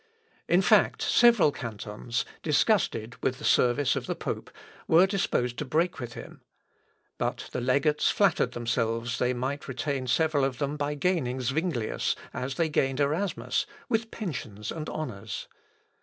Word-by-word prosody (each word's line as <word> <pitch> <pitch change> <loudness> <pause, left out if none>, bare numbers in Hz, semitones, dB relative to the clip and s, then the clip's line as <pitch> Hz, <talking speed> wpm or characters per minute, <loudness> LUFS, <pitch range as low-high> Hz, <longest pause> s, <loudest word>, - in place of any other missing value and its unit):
In 180 +3 +4
fact, 210 +2 +4
several 235 -10 +5
cantons, 115 0 -4 0.2
disgusted 145 - +1
with 130 - 0
the 150 - -12
service 125 +1 +3
of - - -4
the - - -1
pope, - - -4 0.4
were 165 +3 +6
disposed 190 - 0
to - - -1
break 160 +6 0
with 120 -2 -6
him. - - -10 0.8
But - - -2
the 125 - -3
legates 140 +4 +2
flattered 170 - +2
themselves 115 0 -1
they 125 0 +1
might 135 +4 -3
retain 130 0 -2
several 155 +2 +2
of 135 -2 0
them 140 +1 -2
by 145 0 -2
gaining 145 -6 0
Zuinglius, 135 -2 -1 0.2
as 130 +1 -3
they 165 +1 +1
gained 135 -3 0
Erasmus, 155 +7 0 0.2
with 225 -1 0
pensions 115 - -5
and 155 -1 -5
honours. 125 -11 -5
140 Hz, 145 wpm, -28 LUFS, 125-160 Hz, 0.8 s, were